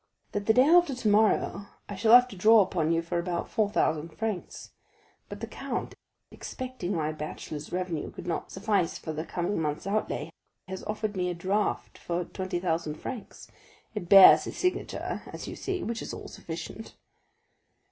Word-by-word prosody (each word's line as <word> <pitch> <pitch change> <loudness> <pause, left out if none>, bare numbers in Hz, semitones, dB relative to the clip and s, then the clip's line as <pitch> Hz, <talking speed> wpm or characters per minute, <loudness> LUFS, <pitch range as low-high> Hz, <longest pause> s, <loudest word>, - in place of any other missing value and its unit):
"That 205 0 -3
the 220 - +6
day 255 - +7
after 330 -1 +5
tomorrow 210 -3 +2 0.2
I 205 - -6
shall 220 +4 +6
have 250 0 +7
to 200 - -9
draw 215 +4 +6
upon 165 -4 -1
you 165 0 +1
for 170 +1 -2
about 170 0 -3
four 215 -3 +1
thousand 160 -5 0
francs; 215 +1 -5 0.6
but - - -8
the - - -2
count, - - -5 0.4
expecting 255 -8 -5
my 155 -1 -1
bachelor's 155 -1 -7
revenue 180 -4 -3
could - - -10
not 175 - -3
suffice 195 -3 0
for 160 - -6
the 155 +1 -3
coming 175 +2 -2
month's 150 +1 -2
outlay, 210 +2 -2 0.4
has 190 0 -6
offered 215 0 -3
me 180 -1 0
a 175 - -3
draft 195 +5 -1
for 175 0 -2
twenty 185 0 -4
thousand 165 -3 -1
francs. 235 +7 -8 0.4
It 205 -6 -5
bears 195 -1 +9
his - - -7
signature, 365 0 -2
as - - -8
you - - -6
see, 380 -2 -3
which 230 0 -3
is - - -5
all - - -8
sufficient." - - -8
190 Hz, 175 wpm, -28 LUFS, 170-215 Hz, 0.6 s, bears